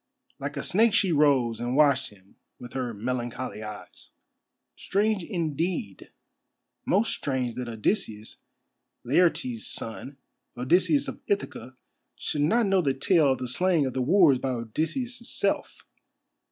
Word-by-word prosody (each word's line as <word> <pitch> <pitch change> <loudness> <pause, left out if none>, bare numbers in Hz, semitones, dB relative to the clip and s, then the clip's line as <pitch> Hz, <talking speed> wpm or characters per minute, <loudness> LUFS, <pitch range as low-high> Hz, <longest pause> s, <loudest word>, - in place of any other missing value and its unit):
Like - - -5
a - - -3
snake 220 +3 +3
she 195 -5 +3
rose 140 -7 +3
and 120 +2 -2
watched 140 -2 +3
him 95 -2 -22 0.2
with 120 0 -11
her 130 -2 -2
melancholy 120 +1 -4
eyes. 105 -1 -10 0.7
"Strange, 205 -1 0
indeed—most 170 - -3
strange 130 -4 -2
that 125 0 -5
Odysseus, 110 - -2 0.7
Laertes' 130 -5 +1
son, 130 +5 -4 0.4
Odysseus 180 - +2
of - - -7
Ithaca, 405 - -3 0.4
should 145 - -3
not 225 +11 +3
know 195 -1 +3
the 135 -5 0
tale 155 0 +3
of - - -5
the 125 0 -4
slaying 170 +3 +2
of 130 - -3
the 130 - -1
wooers 155 -2 +5
by 135 - -2
Odysseus' 155 - -3
self. - - -2
140 Hz, 130 wpm, -26 LUFS, 120-180 Hz, 0.7 s, wooers